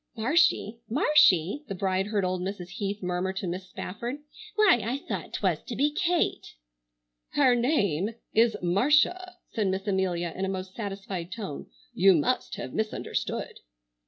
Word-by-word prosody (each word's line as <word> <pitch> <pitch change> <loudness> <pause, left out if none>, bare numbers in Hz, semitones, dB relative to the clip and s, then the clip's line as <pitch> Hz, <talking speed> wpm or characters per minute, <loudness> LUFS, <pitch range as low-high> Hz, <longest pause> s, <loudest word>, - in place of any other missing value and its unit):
"Marshy! 235 - +2
Marshy!" 265 - +4
the 195 - -4
bride 190 +1 0
heard 205 -3 0
old 185 0 -1
Mrs. 185 -1 -5
Heath 200 0 -4
murmur 180 +1 -1
to 190 - -4
Miss 185 +1 -5
Spafford. 235 +7 -5 0.4
"Why, 420 - +5
I 240 +4 -1
thought 280 - -5
'twas - - 0
to - - -5
be 295 +2 +2
Kate!" 345 +2 0 0.8
"Her 265 -4 +5
name 220 - +1 0.2
is 225 -1 +4
Marcia," 300 - +2 0.2
said 215 -4 0
Miss 190 +1 -1
Amelia 185 -4 0
in 190 - -3
a 190 - 0
most 190 0 -5
satisfied 195 -4 -5
tone; 200 -11 -6 0.3
"you 190 0 +5
must 170 +12 0
have - - -6
misunderstood." 220 0 -3
200 Hz, 150 wpm, -27 LUFS, 185-245 Hz, 0.8 s, Why